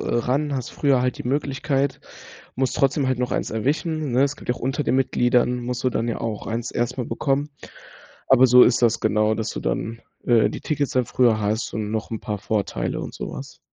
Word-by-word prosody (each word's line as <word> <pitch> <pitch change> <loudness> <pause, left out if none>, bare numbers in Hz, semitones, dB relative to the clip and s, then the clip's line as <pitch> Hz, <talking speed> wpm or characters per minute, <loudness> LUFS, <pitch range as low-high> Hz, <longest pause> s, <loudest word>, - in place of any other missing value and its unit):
ran, 135 +5 0
hast 125 -3 -4
früher 140 -3 +2
halt 125 -1 -1
die - - -4
Möglichkeit, 140 0 -1 0.6
musst 130 0 0
trotzdem 135 0 +2
halt 130 -1 0
noch 125 - -1
eins - - -2
erwischen, 145 +5 -1
ne? 130 +3 +4
Es 140 +1 0
gibt - - -13
ja 125 - +2
auch - - -11
unter 135 +4 -1
den 130 - +1
Mitgliedern, 125 -1 +2
musst 125 0 -4
du 130 - +2
dann 115 0 -1
ja 115 - -2
auch 110 -2 -4
eins 115 +2 -3
erstmal 120 +1 -2
bekommen. 140 +4 -1 0.8
Aber, 130 0 +6
so 125 +1 +8
ist 125 0 +3
das 115 -1 +3
genau, 110 +1 +2
dass 110 0 -3
du - - -5
dann, 110 - -3 0.2
äh, 120 -2 +4
die - - -6
Tickets 145 -2 -1
dann 125 -1 +2
früher 115 -2 +2
hast 110 +2 -1
und 105 -1 -3
noch 110 0 -3
'n 110 - -4
paar 105 -3 -4
Vorteile 105 0 -2
und - - -6
so - - -6
was. - - -9
125 Hz, 220 wpm, -23 LUFS, 115-135 Hz, 0.8 s, so